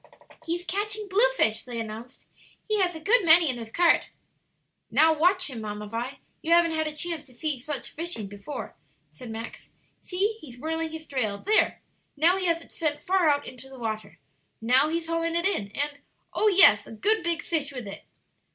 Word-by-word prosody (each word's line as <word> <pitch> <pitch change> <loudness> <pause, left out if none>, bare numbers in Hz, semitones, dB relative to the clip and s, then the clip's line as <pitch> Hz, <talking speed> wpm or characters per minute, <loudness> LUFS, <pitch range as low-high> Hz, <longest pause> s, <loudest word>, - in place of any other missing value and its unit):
"He's 345 +2 -2
catching 420 +2 -3
blue 430 +7 +4
fish," 220 0 +2
they 240 -2 -6
announced; 225 +3 -8 0.4
"he 430 -1 +1
has 355 -2 +1
a - - -6
good 420 +8 +3
many 335 0 +7
in 245 - -7
his 225 -1 -8
cart." 345 +3 +3 0.8
"Now, 320 +1 +5
watch 360 +4 +3
him, 250 -6 -6
Mamma 210 0 -5
Vi; 235 +6 -5 0.2
you 325 - -3
haven't 340 -1 +5
had 315 0 0
a 305 - -5
chance 330 0 -2
to 255 -3 -14
see 305 +5 -1
just 255 0 -10
such 290 -5 -4
fishing 330 -9 -4
before," 205 +8 -8 0.4
said 190 +11 -10
Max. 225 +1 -8 0.3
"See, 410 +4 -1
he's 250 -5 -12
whirling 320 +4 -2
his 320 0 -8
drail; 215 -7 -2
there! 435 +2 +2 0.3
now 340 +5 +4
he 375 -1 -1
has 335 -1 +1
sent 310 -3 0
it - - -22
far 370 -3 +3
out 285 0 +1
into 255 +1 -10
the 265 - -12
water. 215 -7 -5 0.4
Now 250 +6 +3
he's 330 +1 -2
hauling 330 0 -1
it 340 - +1
in, 365 - 0
and 290 0 -2 0.3
oh 430 - +2
yes, 355 - +6
a - - -11
good 425 - +1
big 340 -1 -1
fish 300 -4 -1
with 250 -4 -7
it." 200 - -9
315 Hz, 200 wpm, -26 LUFS, 245-345 Hz, 0.8 s, many